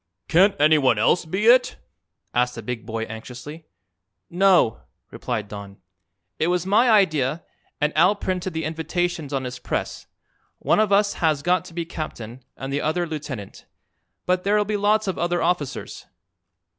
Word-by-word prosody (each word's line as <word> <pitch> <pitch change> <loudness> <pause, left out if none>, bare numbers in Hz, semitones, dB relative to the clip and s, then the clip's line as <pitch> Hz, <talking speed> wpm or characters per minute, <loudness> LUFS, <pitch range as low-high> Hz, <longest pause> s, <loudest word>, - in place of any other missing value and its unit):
"Can't 190 +4 +4
anyone 145 -6 +4
else 115 +11 +2
be 190 +6 -2
it?" 250 +2 +5 0.6
asked 125 0 0
a 115 - -6
big 115 -1 -5
boy 115 -1 -3
anxiously. 125 +8 -9 0.6
"No," 180 - +3 0.3
replied 105 -2 -4
Don. 100 -1 -9 0.6
"It 160 - +1
was 180 0 0
my 220 +6 +4
idea, 160 - +2 0.4
and 150 +1 0
Al 180 +6 +4
printed 185 -2 -3
the 160 0 -3
invitations 160 0 -2
on 135 -2 -2
his 125 -1 -6
press. - - -4 0.5
One - - +1
of 215 -2 +2
us 200 +1 +3
has 150 -3 0
got 180 0 +1
to 165 - -13
be 170 -1 -2
captain 130 -7 -7
and 135 +1 -5
the 145 - 0
other 175 +3 0
lieutenant. 145 - -7 0.6
But 180 0 +1
there'll 210 +1 +2
be 210 +1 -2
lots 210 +1 +2
of 190 - -2
other 175 0 0
officers." 170 -5 -3
160 Hz, 155 wpm, -23 LUFS, 130-185 Hz, 0.6 s, it